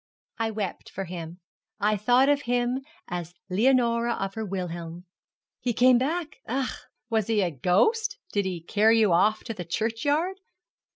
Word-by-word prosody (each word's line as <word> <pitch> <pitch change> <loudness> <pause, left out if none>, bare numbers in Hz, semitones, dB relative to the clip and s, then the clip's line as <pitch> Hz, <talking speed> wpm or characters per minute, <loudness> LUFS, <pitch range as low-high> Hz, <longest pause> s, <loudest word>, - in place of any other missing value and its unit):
I 225 0 +1
wept 210 -3 -4
for 195 - -5
him; 170 -1 -7 0.4
I 210 +1 +2
thought 245 +6 +4
of 290 0 +3
him 245 0 0 0.3
as 175 -1 -5 0.2
Leonora 235 +2 +3
of 195 0 -3
her 220 - -4
Wilhelm. 175 -3 -5 0.5
He 245 - -1
came 250 +1 +5
back. 310 +4 -2
Ach!' 260 +2 -3 0.2
'Was 220 -3 +1
he 220 -2 +2
a 180 -3 0
ghost? 405 - +2 0.2
Did 200 -1 +1
he 180 -3 -3
carry 215 +6 +3
you 215 -5 +4
off 215 +5 +3
to 225 - -4
the 180 - -6
churchyard?' 285 - -1
220 Hz, 160 wpm, -26 LUFS, 185-250 Hz, 0.5 s, came